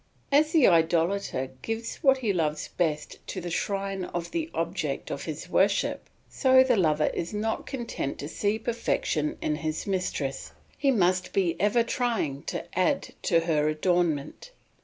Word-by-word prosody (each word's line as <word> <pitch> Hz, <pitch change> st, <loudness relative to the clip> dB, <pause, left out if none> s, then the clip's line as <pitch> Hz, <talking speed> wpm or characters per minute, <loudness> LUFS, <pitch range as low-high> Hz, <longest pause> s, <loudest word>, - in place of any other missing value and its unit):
As 300 Hz, +2 st, +4 dB
the 315 Hz, -6 st, +5 dB
idolater 165 Hz, -4 st, +2 dB
gives 225 Hz, +1 st, -4 dB
what 270 Hz, -2 st, +4 dB
he 225 Hz, -6 st, 0 dB
loves 155 Hz, -4 st, -1 dB
best 155 Hz, -4 st, -2 dB
to 190 Hz, -, -4 dB
the 175 Hz, -1 st, -5 dB
shrine 195 Hz, 0 st, -2 dB
of 175 Hz, -1 st, -5 dB
the 325 Hz, -1 st, -2 dB
object 165 Hz, -4 st, -3 dB
of 140 Hz, -, -4 dB
his 155 Hz, +2 st, -5 dB
worship, 195 Hz, +2 st, +1 dB, 0.2 s
so 260 Hz, -1 st, +5 dB
the 255 Hz, -2 st, +3 dB
lover 155 Hz, -6 st, +2 dB
is 170 Hz, +5 st, -3 dB
not 220 Hz, +2 st, -2 dB
content 235 Hz, -, -4 dB
to 145 Hz, -, -5 dB
see 205 Hz, +6 st, 0 dB
perfection 220 Hz, -9 st, -1 dB
in 150 Hz, -, 0 dB
his 155 Hz, 0 st, -3 dB
mistress, 180 Hz, -8 st, -2 dB, 0.2 s
he 280 Hz, -, +1 dB
must 185 Hz, -6 st, +2 dB
be 180 Hz, -4 st, +1 dB
ever 210 Hz, +5 st, +3 dB
trying 225 Hz, -, -1 dB
to -, -, -4 dB
add 185 Hz, +10 st, +1 dB
to 170 Hz, -3 st, +3 dB
her 155 Hz, -3 st, +1 dB
adornment. 165 Hz, -, 0 dB
180 Hz, 160 wpm, -27 LUFS, 155-225 Hz, 0.2 s, the